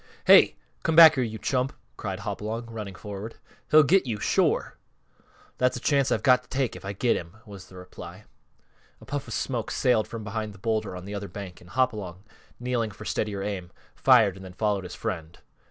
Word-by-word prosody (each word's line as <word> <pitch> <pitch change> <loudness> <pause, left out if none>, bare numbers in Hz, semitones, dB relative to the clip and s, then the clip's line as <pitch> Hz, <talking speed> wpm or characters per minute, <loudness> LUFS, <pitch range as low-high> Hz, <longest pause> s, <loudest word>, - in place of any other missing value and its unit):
"Hey! - - +7 0.3
Come 160 - 0
back 160 -1 +10
here, 130 -4 0
you 110 -2 -4
chump!" 130 +2 -1 0.2
cried - - -5
Hopalong, 110 +3 -4
running 105 -4 -6
forward. 105 +3 -7 0.3
"He'll 155 +1 +7
get 180 0 +3
you, 110 -3 -2
shore!" - - +1 0.8
"That's 125 0 +2
a - - -5
chance 140 0 +2
I've - - 0
got 125 -2 +5
to - - -27
take 130 -3 -1
if - - -10
I 100 - -4
get 120 +4 +1
him," 85 +5 -7
was 100 -3 -11
the 95 - -16
reply. 90 0 -11 0.8
A - - -15
puff 140 -1 -4
of 115 - -4
smoke 120 -4 -2
sailed 125 -4 +2
from 115 -2 -7
behind 105 0 -4
the - - -13
bowlder 110 -2 -2
on 90 0 -8
the 100 - -7
other 100 0 -4
bank 95 -1 -9
and 90 - -16
Hopalong, 100 -6 -1 0.4
kneeling 120 -2 -1
for 105 +1 -11
steadier 100 -3 -2
aim, 95 -4 -4 0.2
fired 115 -8 +5
and 95 - -11
then 95 -1 -10
followed 100 -2 -1
his 90 - -8
friend. 85 -2 -5
110 Hz, 200 wpm, -26 LUFS, 95-125 Hz, 0.8 s, back